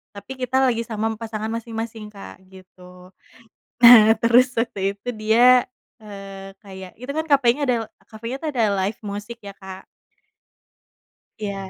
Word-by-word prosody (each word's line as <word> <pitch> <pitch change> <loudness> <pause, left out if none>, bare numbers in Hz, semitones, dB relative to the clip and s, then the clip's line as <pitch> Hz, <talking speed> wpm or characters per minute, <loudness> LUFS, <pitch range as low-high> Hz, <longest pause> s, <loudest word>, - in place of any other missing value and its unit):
tapi 200 +6 -9
kita 255 +1 -1
lagi 230 -2 0
sama 220 0 -2
pasangan 220 -1 -5
masing-masing 225 -1 -6
Kak, 195 -1 -12
gitu. 180 -1 -16 0.7
Nah 225 -2 +9
terus 245 +2 +4
waktu 200 -4 -2
itu 205 +5 -8
dia, 240 +4 +4 0.4
eee, 195 -2 -10
kayak 190 -2 -11
itu 255 +3 -6
kan 315 +2 -3
cafe-nya 275 -1 +3
ada 250 - +2 0.3
cafe-nya 230 +4 -7
tuh 315 - -4
ada 230 -3 +1 0.2
live 205 +2 -4
musik 205 +3 -7
ya 200 - -8
Kak 190 -1 -10 1.6
Iya. 200 -2 -6
220 Hz, 140 wpm, -21 LUFS, 195-240 Hz, 1.6 s, Nah